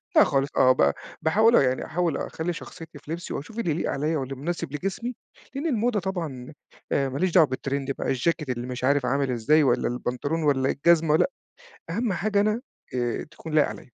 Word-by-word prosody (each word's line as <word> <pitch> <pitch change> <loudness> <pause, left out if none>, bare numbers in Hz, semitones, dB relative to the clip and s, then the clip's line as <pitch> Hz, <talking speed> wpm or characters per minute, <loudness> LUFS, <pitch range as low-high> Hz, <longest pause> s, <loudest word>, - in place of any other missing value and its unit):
لأ - - +8
خالص، 135 +1 +1
آه 130 - +6
ب 70 - +3 0.3
باحاول 220 +9 +4
أهو - - +7
يعني 130 0 0
أحاول 175 0 0
أخلّي 170 +2 -3
شخصيتي 165 -2 -10
في 150 - -10
لِبسي 170 +2 -4
واشوف 210 +11 -6
اللي 175 -8 0
يليق 160 - -1
عليَّ 150 +3 -1
واللي 135 -1 -3
مناسب 150 +1 -4
لجسمي، 210 +9 -3 0.4
لإن 280 +4 -3
الموضة 240 -4 +1
طبعًا 160 -9 -5 0.4
آآ 135 -1 +1
ما 135 - -4
ليش 185 -1 +1
دعوة 160 -4 +6
بالتريند 135 +1 -3
بقى - - -4
الجاكيت 155 +3 0
اللي 125 0 -3
مش 125 0 -5
عارف 140 0 +3
عامل 135 +1 +1
إزاي 150 +7 +3
والّا 135 - +2
البنطلون 125 +6 -2
والّا 135 -2 +2
الجزمة، 160 0 +3
لأ، - - +2 0.6
أهم 215 +4 0
حاجة 205 +2 +1
أنا 215 +3 +1 0.3
آآ، 120 -1 -1
تكون 160 - -9
لايق 155 -1 +5
عليَّ. - - -7
155 Hz, 200 wpm, -25 LUFS, 135-175 Hz, 0.6 s, لأ